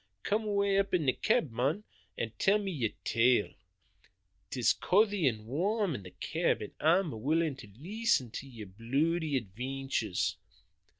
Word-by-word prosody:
Come 215 +2 0
awa' 200 -1 +2
up 195 -1 +1
into 165 -4 0
the 130 - +3
cab, 145 - +1
mon, 135 - 0 0.3
an' 115 - -2
tell 205 +2 +4
us - - -5
yer 135 - -1
tale. 120 -1 +3 1.0
'Tis 120 -1 +2
couthy 200 -4 +2
an' 110 -4 -1
warm 190 - 0
in 120 - -5
the 90 - -10
cab, - - -1
an' - - -7
I'm 160 - +2
willin' 155 +2 +1
to 120 - -11
leesten 150 - -1
to 135 - -6
yer 115 -4 -9
bluidy 140 - -1
advaintures." 125 -1 -2
140 Hz, 155 wpm, -31 LUFS, 115-195 Hz, 1.0 s, tell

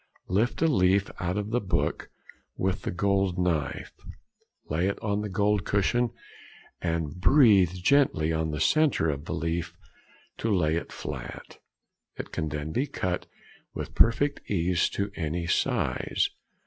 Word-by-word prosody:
Lift 110 - +1
a - - +5
leaf 95 - +3
out 90 +2 -1
of 105 +1 -3
the 120 +1 +1
book 90 -4 -1 0.5
with 95 0 -1
the - - -3
gold 95 0 +1
knife, 85 -6 -1 0.7
lay 85 +5 0
it 100 - -1
on 100 -1 0
the 105 - -4
gold 100 +1 +1
cushion, 120 +4 +1 0.7
and 85 -1 -2
breathe 100 - +6
gently 90 - +2
on 80 0 0
the 75 -1 -3
centre 145 - +3
of 70 +1 -6
the - - -3
leaf 80 +1 -3 0.6
to 115 - -1
lay 85 -6 +2
it 85 - -4
flat; - - -7 0.6
it - - -6
can 80 - -2
then 75 +1 -4
be 130 - 0
cut 90 -8 -3 0.5
with - - -5
perfect 140 +5 +3
ease 90 -2 +1
to 100 0 -3
any 85 0 -2
size. 85 - 0
90 Hz, 150 wpm, -27 LUFS, 80-105 Hz, 0.7 s, breathe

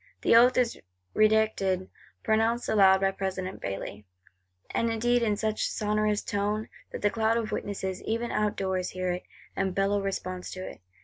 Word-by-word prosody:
The - - +5
Oath 245 +2 +6
is 245 -2 +1 0.4
redacted; 215 -4 +2 0.4
pronounced 225 +2 +1
aloud 195 -3 +5
by 195 0 +3
President 190 -1 -4
Bailly,—and 95 - -6
indeed 240 +2 +2
in 210 -3 +1
such 215 0 -1
a - - +2
sonorous 210 0 0
tone, 210 +2 -2 0.2
that - - -7
the 205 - +3
cloud 225 0 +1
of 225 -2 -2
witnesses, 190 -2 -3
even 230 +2 -2
outdoors, 190 -3 -1
hear 185 -1 -2
it, 180 0 -4 0.3
and 190 -1 -1
bellow 200 +1 +1
response 185 -2 -4
to 185 0 -6
it. - - -10
200 Hz, 160 wpm, -28 LUFS, 185-220 Hz, 0.4 s, Oath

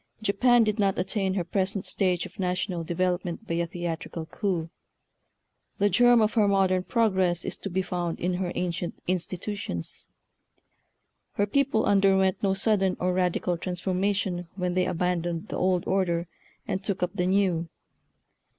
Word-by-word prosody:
Japan 240 +4 +4
did 215 0 0
not 195 -2 +2
attain 190 0 -1
her 185 - 0
present 195 +2 -1
stage 180 -3 0
of - - -13
national 180 -1 -1
development 180 +3 -2
by 170 - -2
a 170 0 0
theatrical 170 -1 -4
coup. 170 -2 -2 1.1
The 205 0 +2
germ 245 -1 +6
of 215 0 +2
her 215 -3 +4
modern 190 -2 +3
progress 190 -7 +1
is - - -3
to 195 - -5
be 190 +1 0
found 175 -2 -3
in 180 +1 0
her 180 -2 -1
ancient 175 0 -2
institutions. 185 - -3 1.3
Her 205 - +1
people 260 0 +1
under 195 -1 +4
went 190 -1 +1
no 195 -1 +2
sudden 195 -2 +1
or 180 0 +1
radical 180 -1 0
transformation 185 0 -1
when 180 -2 -1
they 180 0 +1
abandoned 175 +1 -1
the - - -3
old 185 -1 +2
order 175 -3 0 0.4
and 190 - -2
took 195 -2 -2
up 180 - -1
the 180 -3 0
new. 185 -4 +1
185 Hz, 155 wpm, -27 LUFS, 175-200 Hz, 1.3 s, germ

